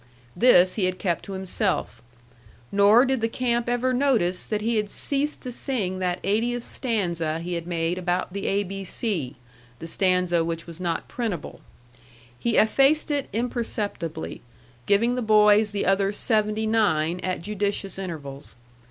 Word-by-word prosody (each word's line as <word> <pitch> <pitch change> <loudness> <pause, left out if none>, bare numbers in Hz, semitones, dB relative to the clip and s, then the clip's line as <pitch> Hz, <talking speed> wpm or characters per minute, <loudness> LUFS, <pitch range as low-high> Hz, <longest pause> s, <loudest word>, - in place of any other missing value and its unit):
This 185 -7 +5
he 200 - 0
had 185 0 -1
kept 175 -4 -1
to 195 - -7
himself; 190 +1 -2 0.7
nor 205 +5 +6
did 265 -2 0
the 225 - +2
camp 240 0 -1
ever 245 +1 +1
notice 240 -10 +1
that 215 -1 -1
he 230 +1 0
had 210 -1 -1
ceased 290 +5 -2
to 250 - -5
sing 215 -8 -2
that 180 -1 0
eightieth 230 +4 0
stanza 170 - -1
he 175 +2 -4
had 170 0 -4
made 170 +1 -1
about 180 0 -1
the 200 0 -3
A 200 +1 +1
B 195 0 -6
C 180 - -2 0.4
the 165 - -8
stanza 180 -1 +2
which 165 0 -4
was 170 +1 -10
not 170 -2 -2
printable. 215 -10 -4 0.8
He 235 - 0
effaced 275 +8 +4
it 285 -2 -1
imperceptibly, 210 - -3 0.5
giving 230 +4 +3
the 250 - -1
boys 215 -1 +5
the 205 -1 -2
other 195 +1 +2
seventy 215 0 0
nine 180 -7 +1
at 185 -2 -3
judicious 200 -1 -2
intervals. 145 -7 -7
200 Hz, 155 wpm, -25 LUFS, 180-230 Hz, 0.8 s, nor